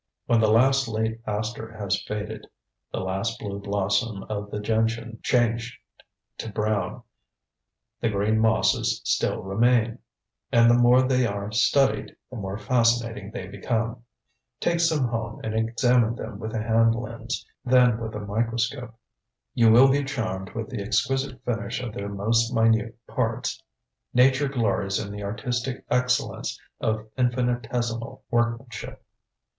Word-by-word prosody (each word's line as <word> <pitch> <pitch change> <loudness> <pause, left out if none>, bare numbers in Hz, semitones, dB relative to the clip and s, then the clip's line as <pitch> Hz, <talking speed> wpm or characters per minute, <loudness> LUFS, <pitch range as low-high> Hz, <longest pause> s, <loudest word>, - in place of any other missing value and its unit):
When 115 - +3
the 110 -1 +4
last 130 +4 +4
late 110 +1 -2
aster 110 +2 -3
has 100 -2 -1
faded, 105 0 -5 0.4
the - - -3
last 95 +5 -2
blue 100 -3 -5
blossom 100 +1 -1
of 105 -1 -5
the 105 - -4
gentian 115 +1 -1
changed 120 -1 +1 0.6
to 110 - -5
brown, 105 0 -1 1.0
the 115 - +1
green 105 +2 +1
mosses 110 0 +2
still - - 0
remain. 115 +4 +2 0.5
And 115 -2 +6
the - - +5
more 120 +1 +5
they 130 -1 +2
are 100 0 -4
studied, 135 +5 +2 0.2
the 125 - -6
more 100 -1 -4
fascinating 115 -3 +1
they 120 +3 -6
become. 115 0 -2 0.6
Take 170 0 +1
some 160 -6 +2
home 115 0 -4
and 110 - -3
examine 115 +1 +2
them 110 -4 -7
with 110 +1 -5
a 110 - -1
hand 115 0 +3
lens, 115 0 -5 0.2
then 125 -2 +4
with 110 -2 -5
a 105 - -4
microscope. 115 +3 -2 0.6
You 115 -2 +5
will 130 +4 +7
be 140 +1 +2
charmed 110 -9 -4
with 115 +1 -4
the 120 -5 -3
exquisite 130 +5 -1
finish 115 0 -2
of 120 -4 -5
their 100 0 -4
most 115 +4 +1
minute 115 -2 +2
parts. - - -2 0.5
Nature 135 +3 +5
glories 100 -7 0
in 100 -1 -4
the 105 0 -6
artistic 120 +5 -3
excellence 125 0 0 0.2
of 110 0 -1
infinitesimal 120 -2 -1
workmanship. 120 -1 -2
115 Hz, 140 wpm, -25 LUFS, 110-120 Hz, 1.0 s, will